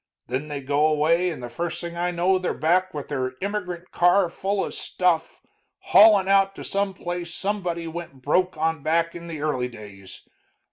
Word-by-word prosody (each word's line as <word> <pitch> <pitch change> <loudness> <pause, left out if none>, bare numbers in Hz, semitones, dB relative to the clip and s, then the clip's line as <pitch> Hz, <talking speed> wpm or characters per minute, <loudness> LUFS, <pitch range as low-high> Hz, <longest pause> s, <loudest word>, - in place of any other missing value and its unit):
Then 130 +5 -3
they 145 -2 -5
go 145 +3 +2
away, 160 +4 +2
and 155 -7 -6
the - - -4
first 165 +8 -4
thing 170 0 -6
I 175 +1 -1
know 180 +2 +2
they're 185 - -2
back 180 +4 +2
with 145 -2 -7
their 130 -3 -2
immigrant 185 -3 -4
car 175 +1 +4
full 195 +2 -1
of - - -7
stuff, 170 -3 -1 0.5
haulin' 205 -2 +7
out 195 0 +3
to - - -8
some 200 -1 -1
place 175 -2 -5
somebody 180 -5 -2
went 165 -5 -8
broke 180 +4 +1
on 160 -1 0
back 165 +3 +1
in 170 0 -9
the 160 -3 -6
early 130 -5 0
days. 100 -5 -12
170 Hz, 185 wpm, -24 LUFS, 150-185 Hz, 0.5 s, haulin